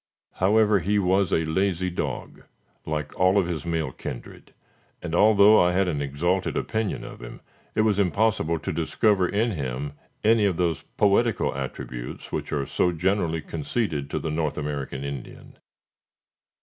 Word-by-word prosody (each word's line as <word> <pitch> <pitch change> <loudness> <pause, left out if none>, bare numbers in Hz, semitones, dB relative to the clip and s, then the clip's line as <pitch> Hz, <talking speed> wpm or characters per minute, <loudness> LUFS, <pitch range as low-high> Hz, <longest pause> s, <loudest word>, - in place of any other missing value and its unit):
However, 105 +2 +4
he 100 +4 0
was 95 -1 +2
a 80 - +2
lazy 90 +2 0
dog, 85 - -4 0.5
like 75 -1 -3
all 90 +2 +4
of 100 - +3
his 85 -2 -4
male 80 -5 -1
kindred, - - -8 0.5
and, 85 -2 -6
although 105 +3 +6
I 90 0 +3
had 95 +1 +2
an 75 -5 -1
exalted 85 +7 -1
opinion 110 -2 -2
of - - -9
him, - - -9 0.4
it 110 - +3
was 105 -2 +2
impossible 100 -4 +1
to 90 +4 -4
discover 90 +4 +2
in 110 +3 +1
him 70 - -4 0.3
any 110 -1 +4
of 95 -4 +1
those 85 -5 0 0.2
poetical 105 +3 +2
attributes 65 -2 -6
which - - -4
are 70 -2 -1
so 90 - +1
generally 85 -1 0
conceded 80 -3 -2
to - - -2
the 80 - -3
North 80 -1 -1
American 70 -2 -4
Indian. 70 -3 -8
90 Hz, 155 wpm, -25 LUFS, 75-100 Hz, 0.5 s, although